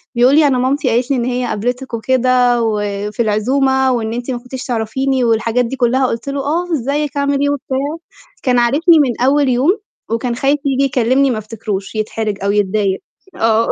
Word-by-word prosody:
بيقول 250 Hz, +4 st, +4 dB
لي: 305 Hz, -1 st, +5 dB
"أنا 260 Hz, -3 st, +2 dB
مامتي 265 Hz, +3 st, 0 dB
قالت 240 Hz, +3 st, 0 dB
لي 270 Hz, -, +2 dB
إن 235 Hz, -, -1 dB
هي 250 Hz, 0 st, -1 dB
قابلتِك 245 Hz, +4 st, -3 dB
وكده، 250 Hz, 0 st, +2 dB
وفي 205 Hz, -1 st, -3 dB
العزومة، 265 Hz, +5 st, +1 dB
وإن 225 Hz, -3 st, -1 dB
أنتِ 245 Hz, +2 st, -4 dB
ما 245 Hz, -, -2 dB
كنتيش 250 Hz, +2 st, -8 dB
تعرفيني." 255 Hz, +2 st, -1 dB
والحاجات 230 Hz, +1 st, +1 dB
دي 250 Hz, -, -4 dB
كُلّها. 255 Hz, +1 st, +2 dB
قُلت 230 Hz, +3 st, -4 dB
له: 280 Hz, -, -3 dB
"آه، 335 Hz, +6 st, -2 dB
إزيك 285 Hz, +1 st, -1 dB
عامل 280 Hz, 0 st, +1 dB
إيه؟" 285 Hz, -, +2 dB
وبتاع. 270 Hz, -2 st, -2 dB, 0.7 s
كان 250 Hz, -3 st, +2 dB
عارفني 310 Hz, +7 st, +4 dB
من 245 Hz, -4 st, 0 dB
أول 275 Hz, +1 st, +3 dB
يوم، 290 Hz, -, +2 dB, 0.3 s
وكان 235 Hz, +1 st, -1 dB
خايف 280 Hz, +3 st, +1 dB
ييجي 275 Hz, 0 st, +1 dB
يكلِّمني 260 Hz, +1 st, +2 dB
ما 220 Hz, -, -2 dB
افتكروش، 215 Hz, -2 st, -5 dB
يتحرج 215 Hz, -1 st, -2 dB
أو 200 Hz, -, +1 dB
يتضايق. 200 Hz, -1 st, 0 dB, 0.4 s
آه. 225 Hz, 0 st, +2 dB
250 Hz, 185 wpm, -16 LUFS, 225-270 Hz, 0.7 s, لي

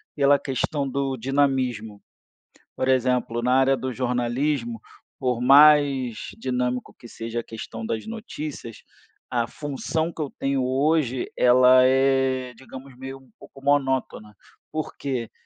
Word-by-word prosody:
pela 140 Hz, -1 st, +4 dB
questão 140 Hz, +1 st, -2 dB
do 135 Hz, 0 st, -2 dB
dinamismo, 130 Hz, -5 st, -1 dB, 0.8 s
por -, -, -1 dB
exemplo, 125 Hz, -2 st, +1 dB
na 125 Hz, +1 st, +2 dB
área 135 Hz, +1 st, +4 dB
do 130 Hz, 0 st, -4 dB
jornalismo, 125 Hz, 0 st, -1 dB, 0.4 s
por 125 Hz, -3 st, -1 dB
mais 140 Hz, -3 st, +5 dB
dinâmico 125 Hz, +1 st, -2 dB
que 120 Hz, -, -13 dB
seja 115 Hz, +1 st, -5 dB
a -, -, -7 dB
questão 115 Hz, 0 st, -8 dB
das 110 Hz, -1 st, -3 dB
notícias, 155 Hz, -, -7 dB, 0.5 s
a 120 Hz, -2 st, 0 dB
função 155 Hz, +5 st, -3 dB
que -, -, -10 dB
eu 145 Hz, -3 st, -2 dB
tenho 135 Hz, -1 st, 0 dB
hoje, 130 Hz, -1 st, 0 dB
ela 125 Hz, +1 st, +6 dB
é, 130 Hz, -1 st, +2 dB
digamos, 130 Hz, +2 st, -12 dB
meio 135 Hz, +1 st, -8 dB
um 130 Hz, -1 st, -22 dB
pouco 135 Hz, -, -15 dB
monótona, 130 Hz, -7 st, 0 dB, 0.4 s
por 155 Hz, -1 st, -4 dB
quê? 130 Hz, -5 st, -4 dB
130 Hz, 130 wpm, -24 LUFS, 125-140 Hz, 0.8 s, ela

